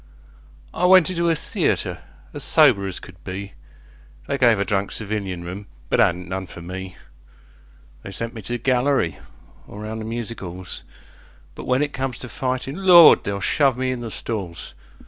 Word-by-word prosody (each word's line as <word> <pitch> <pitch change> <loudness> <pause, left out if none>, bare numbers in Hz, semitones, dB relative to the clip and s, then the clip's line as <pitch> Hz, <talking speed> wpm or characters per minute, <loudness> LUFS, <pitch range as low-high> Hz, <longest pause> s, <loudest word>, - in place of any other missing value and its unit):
I 180 - +2
went 185 -2 +6
into 170 -1 0
a 165 - +3
theatre - - -1 0.3
as - - -6
sober 100 0 +4
as 95 - -5
could 90 -3 -14
be, 100 +1 -6 0.7
They 140 -1 -2
gave 115 -5 +5
a 100 - +1
drunk 100 0 -1
civilian 100 -5 -4
room, 95 +4 -7 0.2
but - - +2
'adn't 90 -5 +2
none 95 +1 -4
for 85 - -11
me; 90 +1 -7 1.1
They - - -9
sent 115 +5 -4
me 115 - -8
to 120 - -5
the - - 0
gallery 125 -6 +1 0.5
or 105 - -9
round 110 +1 -5
the - - -6
music 115 0 -4
'alls, 90 0 -7 0.7
But - - -9
when 130 +3 +2
it 145 - -3
comes 130 -2 -3
to 125 - -8
fightin', 135 +7 -3
Lord! 175 -3 +8
they'll 100 0 -3
shove 135 +1 +2
me 130 0 0
in 130 - -3
the 120 -1 -5
stalls! 100 -7 -5
110 Hz, 180 wpm, -22 LUFS, 95-130 Hz, 1.1 s, Lord